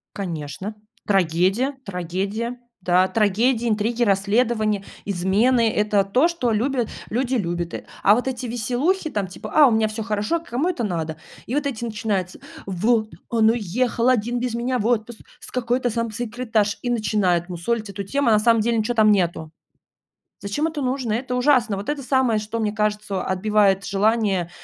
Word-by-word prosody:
Конечно, 180 +2 -5 0.3
трагедия 195 - +1
трагедия, 195 +6 -3 0.2
да, 180 +1 +3
трагедии, 225 +4 +1
интриги, 225 +3 0
расследования, 215 +1 +1 0.2
измены- 210 +6 +2
это 210 -1 +2
то, 250 +11 +3
что 335 -9 -1
любят 240 +2 0 0.2
люди 255 +2 0
любят. 175 -5 -2 0.3
А 205 - +6
вот 250 +3 -2
эти 255 -1 -3
веселухи, 250 - -1
там, 205 -8 -2
типа: 180 - -9
"А 300 -3 +7
у - - +2
меня 220 -1 +2
всё 215 +1 -4
хорошо",- 215 +9 -1
кому 290 +8 -1
это 260 -10 -2
надо? 165 -5 -3 0.3
И 250 - -3
вот 295 0 0
эти 240 -4 -3
начинаются: 210 -5 -2 0.3
"Вот 215 +4 +1 0.2
он 225 -2 +4
уехал 235 +3 0
один 240 0 +1
без 245 -1 -2
меня 245 +2 -1
в 210 - -2
отпуск 235 -1 -1 0.2
с - - -11
какой-то 245 0 0
там 230 -1 -2
секретаршей",- 225 -2 -1
и 245 - -3
начинают 200 -6 +1
мусолить 215 +5 -2
эту 200 0 -5
тему. 245 +5 0
На 215 - +5
самом 230 0 +4
деле 235 +1 +1
ничего 220 +2 0
там 215 -2 +5
нету. 170 -5 0 0.9
Зачем 200 +10 -1
это 310 -3 -3
нужно? 255 -3 -1
Это 250 +2 -3
ужасно. 250 -5 +3
Вот 200 +1 -7
это 295 -1 -2
самое, 255 -4 +2
что, 215 +2 -4
мне 210 -1 0
кажется, 210 -2 -1
отбивает 195 0 +2
желание, 200 -3 +1
220 Hz, 165 wpm, -22 LUFS, 200-245 Hz, 0.9 s, А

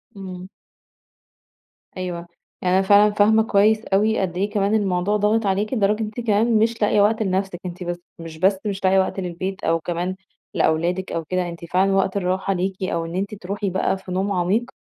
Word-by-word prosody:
امم. 185 -2 -8 1.5
أيوه، 175 -2 -5 0.3
يعني 180 0 +1
أنا - - +4
فعلًا 205 +1 +6
فاهمة 220 +2 +4
كويّس 215 +1 +3
أوي 210 +3 +2
قد 180 -2 -2
إيه 200 +3 0
كمان 205 0 0
الموضوع 200 0 +1
ضاغط 210 +2 +1
عليكِ، 200 +4 0
لدرجة 210 -2 +1
أنتِ 215 +2 -6
كمان 225 0 +2
مش 225 +1 0
لاقية 210 0 +3
وقت 220 +2 +2
لنفسِك. 190 -2 -2
أنتِ 180 0 -6
بس 175 0 -4 0.2
مش 165 -1 -9
بس 190 +4 +3
مش 200 -2 -3
لاقية 190 0 +4
وقت 190 +1 -1
للبيت 185 +2 -4
أو 165 0 +2
كمان 175 +3 -3 0.4
لأولادك 175 +4 0
أو 165 - -2
كده، 180 +1 -1
أنتِ 170 0 -8
فعلًا 185 +3 +2
وقت 195 0 +1
الراحة 190 +1 0
ليكِ 190 +1 -3
أو 170 -3 -1
إن 165 +1 -6
أنتِ 200 +3 -2
تروحي 200 +1 -4
بقى 190 +1 0
في 190 -1 -10
نوم 190 +2 -1
عميق، 200 +7 0
195 Hz, 190 wpm, -22 LUFS, 180-210 Hz, 1.5 s, فعلًا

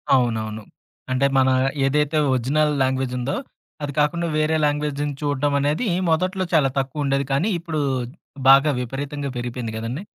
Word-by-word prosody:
అవునవును. 110 -3 -1 0.5
అంటే, 130 +2 +2
మన 130 0 +4 0.4
ఏదైతే 150 +2 +1 0.2
ఒరిజినల్ 145 +5 +1
లాంగ్వేజుందో. 130 0 -1 0.5
అది 145 -1 -3
కాకుండా 170 +4 +1
వేరే 155 +1 +2
లాంగ్వేజ్‌ని 145 0 -1
చూడడం 145 0 0
అనేది 150 - 0 0.2
మొదట్లో 185 +3 0
చాలా 150 -4 +4
తక్కువుండేది. 140 0 -1
కానీ, 165 +11 +1
ఇప్పుడు 160 -3 -3 0.7
బాగా 140 +3 +7
విపరీతంగా 140 +3 -4
పెరిగిపోయింది 120 -2 -4
గదండి! 115 - -4
140 Hz, 125 wpm, -22 LUFS, 130-150 Hz, 0.7 s, బాగా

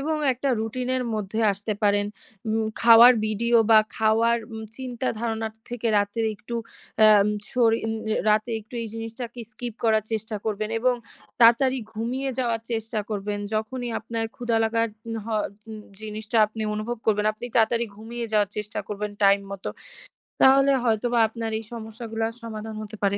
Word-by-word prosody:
এবং 310 +3 -1 0.2
একটা 265 +3 -2
রুটিন 250 +3 -3
এর 250 - -1
মধ্যে 215 +1 -3
আসতে 205 +2 -4
পারেন। 205 0 +3 0.4
উম 220 +1 +1 0.2
খাওয়ার 235 +2 +9
ভিডিও 235 +3 +1
বা 220 - +9 0.2
খাওয়ার 225 +2 +3
উম 220 0 -6
চিন্তা 255 -1 -3
ধারণা 225 -1 -2 0.2
থেকে 240 -1 -2
রাতে 205 +3 -1
একটু 235 +3 -8 0.6
আম 205 +1 +4 0.2
সরিন 225 -2 +2 0.2
অ্যা 215 - +1
রাতে 215 +3 +2
একটু 215 +4 -15
এই - - -4
জিনিসটা 225 +2 -5
কে 240 - -7
স্কিপ 235 0 -6
করার 220 -1 +3
চেষ্টা 220 0 -2
করবেন 215 0 -2
এবং 250 +1 +3 0.5
তাড়াতাড়ি 255 +3 +6
ঘুমিয়ে 250 +5 -2
যাওয়ার 230 -3 0
চেষ্টা 225 -1 -2
করবেন। 205 0 -2 0.2
যখনই 240 +3 -2
আপনার 230 0 -3
ক্ষুধা 240 -2 0
লাগার 230 +1 +1 0.2
উন 225 - -3
হ - - -12 0.4
উন 215 - -6 0.2
জিনিসটা 220 +1 -4
আপনি 220 +1 -6
অনুভব 225 +3 -3
করবেন, 210 -1 +2
আপনি 240 +3 -8
তাড়াতাড়ি 230 +1 +3
ঘুমিয়ে 230 +2 -6
যাওয়ার 205 -2 +2
চেষ্টা 210 +1 -4
করবেন 210 0 -4
টাইম 200 0 +6
মতো। 195 -1 -5 0.7
তাহলে 275 +1 +6
হয়তোবা 235 +1 +1
আপনার 225 0 -5
এই - - -9
সমস্যাগুলার 225 0 -4
সমাধান 220 -1 -6
হতে 215 0 -8
পারে। 200 0 +2
225 Hz, 165 wpm, -25 LUFS, 215-235 Hz, 0.7 s, খাওয়ার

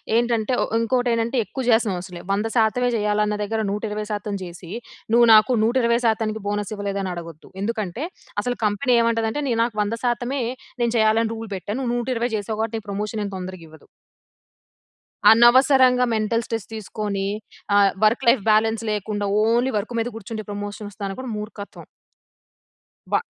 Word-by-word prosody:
ఏంటంటే 235 0 +1
ఓ - - 0
ఇంకోటి 245 +2 +1
ఏంటంటే 230 +3 0
ఎక్కువ 265 - -5
జేస్తనం 225 -5 +3
అసలే. 180 -2 -9
వంద 205 +3 0
శాతమే 235 +3 +2
చేయాలన్న 210 0 +1
దగ్గర 220 +2 -2
120% 210 0 -3
జేసి 175 -1 -10 0.4
నువ్వు 235 0 +6
నాకు 215 +4 +6
120% 230 -2 +1
బోనస్ 205 0 -2
ఇవ్వలేదని 200 -2 -3
అడగొద్దు. 165 -3 -9
ఎందుకంటే 220 - -3 0.4
అసలు 245 +1 -2
కంపెనీ 210 +5 +2
ఏమంటదంటే 230 +3 0
నే - - +2
నాకు 230 -2 -3
వంద 215 +3 -3
శాతమే 245 +3 -1 0.4
నేను 235 -1 +1
చేయాలని 220 +1 +3
రూల్ 225 -1 -7
పెట్టాను. 205 +6 -4
నువ్వు 240 -2 -1
120 240 -1 -1
చేసావు 215 +1 -4
కాబట్టి 225 0 -2
నీకు 210 -1 -14
ప్రమోషన్ 210 +2 -3
ఏం 200 - -5
తొందరగా 185 -2 -7
ఇవ్వదు. 160 0 -17 1.5
అనవసరంగా 250 +2 +6
మెంటల్ 220 +2 0
స్ట్రెస్ 225 -3 -4
తీసుకొని. 210 -2 -3 0.5
ఆహ్, 200 -1 +5
వర్క్ 235 +5 +2
లైఫ్ 235 -2 +4
బ్యాలెన్స్ 220 +1 +2
లేకుండా. 205 0 -2 0.2
ఓన్లీ 240 +4 +2
వర్క్ 205 +4 -4
మీద 225 - -2
కూర్చుంటే 220 0 -6
ప్రమోషన్ 205 +1 -6
వస్తాదనుకోడం 200 +5 -5
మూర్ఖత్వం. 210 -1 -8 1.2
బ - - +1
220 Hz, 145 wpm, -22 LUFS, 205-235 Hz, 1.5 s, నువ్వు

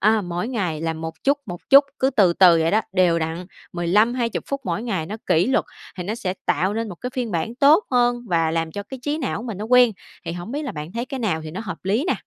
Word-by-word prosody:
à, 215 +1 +4
mỗi 175 +4 -3
ngày 180 -11 -2
là 165 0 -1
một 160 0 -6
chút, 280 +1 +3
một 175 -2 -7
chút, 280 +1 +9
cứ 265 +1 +2
từ 195 -8 +4
từ 175 -2 +6
vậy 165 - +2
đó, 215 - +3
đều 180 -3 +3
đặn, 165 +2 -4 0.3
15-20 215 +7 +1
phút 275 0 -3
mỗi 185 +4 -2
ngày, 190 -10 -2
nó 210 - -5
kỷ 165 +4 +3
luật, 265 - +2 0.3
thì 180 - -4
nó 210 - -2
sẽ 190 -6 -3
tạo 190 +4 +1
nên 225 0 -2
một 190 - -7
cái 250 - -4
phiên 245 -3 -2
bản 185 +6 -2
tốt 295 +9 +5
hơn 245 -1 +2
và 165 -2 +2
làm 165 0 -2
cho 205 - -4
cái 265 +5 -9
trí 295 +3 -1
não 255 -5 -3
mình 225 -6 -6
nó 210 - -4
quen. 245 0 +5 0.3
Thì 165 - -4
hổng 175 +6 -7
biết 295 +2 -2
là 275 - -4
bạn 150 +3 -7
thấy 235 +1 -3
cái 270 -2 -5
nào 185 -8 0
thì 155 - -6
nó 185 +7 -6
hợp 185 -7 -6
lý 215 - +1
nè? - - +3
205 Hz, 270 wpm, -22 LUFS, 170-245 Hz, 0.3 s, chút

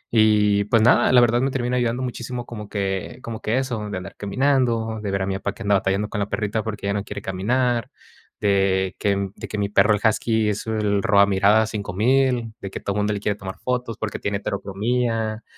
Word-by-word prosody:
Y, 105 -2 +4
pues, 115 +1 +3
nada, 120 - +5
la 125 -1 +7
verdad 120 +1 +3
me 135 - +1
termina 125 -1 -1
ayudando 120 +1 0
muchísimo 120 0 -5
como 105 -4 -8
que 100 +3 -3
como 115 -1 -5
que 110 +4 0
eso, 115 -6 -3
de 100 - -4
andar 95 +1 -8
caminando, 115 -1 0
de 105 - -3
ver 100 0 0
a 95 - -3
mi 95 - -1
papá 100 +1 -3
que - - -9
anda 100 0 +3
batallando 100 +1 0
con 105 - -4
la 100 0 -2
perrita, 105 0 -1
porque 105 -2 -5
ya 100 - +1
no 100 -1 -2
quiere - - -7
caminar, 120 +5 0 0.5
de 95 -2 +1
que 100 -2 0
de - - -7
que 105 - -5
mi 100 - 0
perro, 105 +1 +4
el 105 - -5
husky 110 0 +2
es 105 +2 -3
el 105 -2 0
roba 100 -2 +5
miradas 105 +3 +3
5000, 115 +4 +1
de 100 - -5
que - - -5
todo 100 - -3
mundo 105 0 +1
le 100 - -3
quiere 105 0 -1
tomar 95 -2 -7
fotos, 125 -3 -2
porque 110 -2 -4
tiene 100 0 -1
heterocromía 110 +3 -2
105 Hz, 220 wpm, -22 LUFS, 100-120 Hz, 0.5 s, la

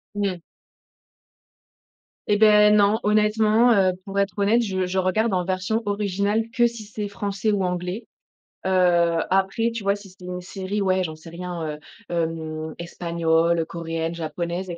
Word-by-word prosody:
Mmh. 200 -3 -1 1.9
Eh 205 - +3
beh, 210 -1 +6
non. 210 +1 +4
Honnêtement, 215 +2 +3
heu, 190 -3 +3
pour 200 0 -2
être 200 -1 -1
honnête, 210 +4 +3
je 190 -4 -1
je 180 +1 -3
regarde 200 +4 +1
en 180 -1 +1
version 190 +5 -1
originale 205 +2 0
que 240 0 +3
si 235 -2 -7
c'est 210 0 -5
français 200 +1 -2
ou 200 -2 0
anglais. 180 +4 -3 0.6
Heu, 175 -3 +3
après 195 +5 +1
tu 230 -2 -5
vois, 200 0 +2
si 200 -1 -12
c'est 185 0 -18
une 180 0 -5
série, 190 +3 -4
ouais, 185 -1 +2
j'en 160 -3 -4
sais 160 +2 -13
rien, 175 0 -6
heu, 150 0 -5 0.3
hem 160 -2 -3
espagnole, 170 -1 0
coréenne, 165 0 -4
japonaise 170 +3 -4
et 170 - -5
190 Hz, 160 wpm, -23 LUFS, 170-210 Hz, 1.9 s, beh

